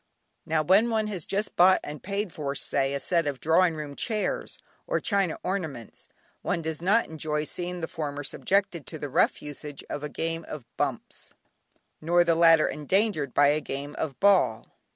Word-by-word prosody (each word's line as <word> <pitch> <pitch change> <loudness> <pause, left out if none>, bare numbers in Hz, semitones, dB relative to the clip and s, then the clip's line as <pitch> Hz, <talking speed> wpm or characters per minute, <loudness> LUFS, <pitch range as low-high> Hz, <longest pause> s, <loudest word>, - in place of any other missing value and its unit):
Now 155 -1 +1
when 195 +8 +4
one 220 -1 +1
has 175 -6 -4
just 205 +2 -2
bought, 185 +1 +6
and 150 0 -7
paid 200 -1 -3
for, 140 -2 -3
say, 140 -1 0
a - - -1
set 165 +2 +1
of 140 -3 -3
drawing 165 +1 +3
room 150 -2 -6
chairs, 215 - -2 0.3
or - - +1
china 195 -6 0
ornaments, 160 - -5 0.3
one 165 - -2
does 160 0 -4
not 205 +6 +3
enjoy 150 -1 -2
seeing 180 +3 -4
the 165 - -2
former 145 -2 -4
subjected 185 +1 0
to 160 - -6
the 145 -1 -5
rough - - +2
usage 145 0 -7
of 145 - -4
a 150 - -3
game 165 +2 -3
of 145 -6 -7
"Bumps" - - -4 0.7
nor 175 +2 +4
the 170 -1 +3
latter 165 -1 +6
endangered 155 - 0
by 145 0 +6
a 150 +1 +1
game 145 +1 -5
of 135 -5 -3
Ball. 190 - +3
160 Hz, 180 wpm, -27 LUFS, 145-185 Hz, 0.7 s, bought